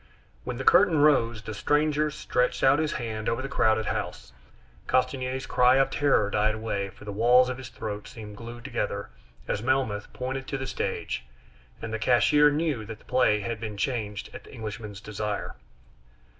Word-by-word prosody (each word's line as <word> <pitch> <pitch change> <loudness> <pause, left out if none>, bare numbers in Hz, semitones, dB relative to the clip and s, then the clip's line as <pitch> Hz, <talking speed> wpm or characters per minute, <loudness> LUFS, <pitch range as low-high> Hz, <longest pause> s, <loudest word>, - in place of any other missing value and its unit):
When - - -4
the - - -4
curtain 180 -6 +5
rose, 120 -7 +3
the 110 - -6
stranger 150 +6 +1
stretched 125 -4 -1
out 135 +2 +5
his 155 -1 0
hand 110 -3 -3
over 125 +3 -1
the - - -3
crowded 110 -5 +2
house. 65 - -4 0.5
Castanier's 130 0 0
cry 125 +1 +4
of 135 0 +3
terror 135 -8 +2
died 105 +1 +2
away, 100 -3 -3
for 105 - -15
the 105 - -5
walls 120 +5 +5
of 125 +1 -4
his 125 -2 -8
throat 105 -3 -6
seemed 105 -2 -9
glued 120 +2 -9
together 105 -6 -3 0.4
as 105 - -1
Melmoth 125 -5 0
pointed 130 +1 -4
to 140 - -2
the 135 - -4
stage, - - -3 0.6
and 115 0 -4
the 110 - -2
cashier 145 +6 +5
knew 145 -5 -1
that 110 0 -8
the - - -23
play 105 -5 +3
had 115 +1 -4
been 105 -2 -5
changed 105 -4 -3
at - - -9
the - - -14
Englishman's 105 -3 -7
desire. 105 0 -4
120 Hz, 180 wpm, -27 LUFS, 105-135 Hz, 0.6 s, curtain